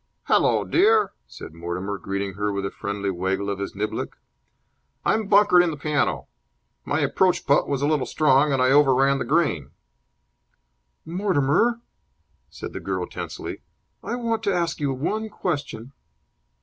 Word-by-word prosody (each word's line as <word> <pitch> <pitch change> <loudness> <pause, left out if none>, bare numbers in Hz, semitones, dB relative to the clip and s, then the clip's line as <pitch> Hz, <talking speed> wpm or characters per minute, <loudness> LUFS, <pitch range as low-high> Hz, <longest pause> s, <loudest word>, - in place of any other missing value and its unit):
"Hallo, - - +3
dear," 425 +4 +3 0.2
said - - -10
Mortimer, 90 +4 -4
greeting 100 0 -3
her 105 +2 -2
with 100 0 -3
a 95 - -3
friendly 100 -1 -3
waggle 95 +2 -2
of 100 - -4
his 100 - -5
niblick. 105 +2 -3 0.9
"I'm 220 -2 +1
bunkered 200 -3 +6
in 175 - +1
the 155 - -5
piano. 145 - -1 0.6
My - - 0
approach 180 -2 +1
putt 140 - +3
was 140 -1 -1
a - - +3
little 150 -3 +1
strong, 150 -1 +3
and 135 - +1
I 130 - +3
over 140 -2 +5
ran 135 +1 +3
the - - -2
green." 140 - +1 1.4
"Mortimer," 180 - +1 0.7
said - - -8
the - - -5
girl, - - -3
tensely, - - -7 0.4
"I - - -3
want 230 -2 -1
to 200 - +2
ask 170 -1 -1
you 145 -2 0
one 210 +12 -2
question." 140 - -4
140 Hz, 155 wpm, -24 LUFS, -, 1.4 s, bunkered